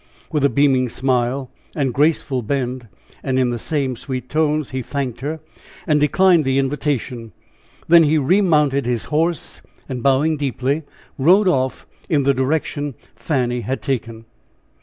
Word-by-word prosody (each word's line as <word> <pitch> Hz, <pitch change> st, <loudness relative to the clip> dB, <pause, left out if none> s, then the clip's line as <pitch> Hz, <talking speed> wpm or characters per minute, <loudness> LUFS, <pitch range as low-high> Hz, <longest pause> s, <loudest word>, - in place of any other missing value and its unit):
With 150 Hz, -3 st, 0 dB
a 140 Hz, -, +5 dB
beaming 135 Hz, -3 st, +2 dB
smile 130 Hz, +1 st, -1 dB, 0.2 s
and 135 Hz, -5 st, 0 dB
graceful 145 Hz, -2 st, +1 dB
bend, 125 Hz, 0 st, -3 dB, 0.3 s
and 130 Hz, -1 st, -1 dB
in 125 Hz, -2 st, +2 dB
the 120 Hz, -, -3 dB
same 140 Hz, -2 st, -2 dB
sweet 130 Hz, 0 st, -6 dB
tones, 155 Hz, -2 st, 0 dB
he 130 Hz, 0 st, -3 dB
thanked 130 Hz, -1 st, -4 dB
her, 155 Hz, +3 st, -4 dB, 0.4 s
and 150 Hz, -1 st, +2 dB
declined 175 Hz, +3 st, +4 dB
the 135 Hz, 0 st, 0 dB
invitation. 135 Hz, -5 st, -2 dB, 0.5 s
Then 165 Hz, -1 st, +7 dB
he 155 Hz, +1 st, +3 dB
remounted 150 Hz, -, +2 dB
his 120 Hz, -2 st, -1 dB
horse, 165 Hz, +2 st, -1 dB, 0.3 s
and 130 Hz, -3 st, -5 dB
bowing 140 Hz, +4 st, +2 dB
deeply, 140 Hz, +1 st, -1 dB, 0.4 s
rode 185 Hz, +9 st, +5 dB
off 130 Hz, -6 st, 0 dB, 0.2 s
in 150 Hz, -5 st, +2 dB
the 140 Hz, +1 st, +3 dB
direction 145 Hz, +1 st, -1 dB, 0.2 s
Fanny 125 Hz, 0 st, -1 dB
had 130 Hz, +5 st, -4 dB
taken. 115 Hz, -4 st, -3 dB
135 Hz, 145 wpm, -20 LUFS, 130-150 Hz, 0.5 s, Then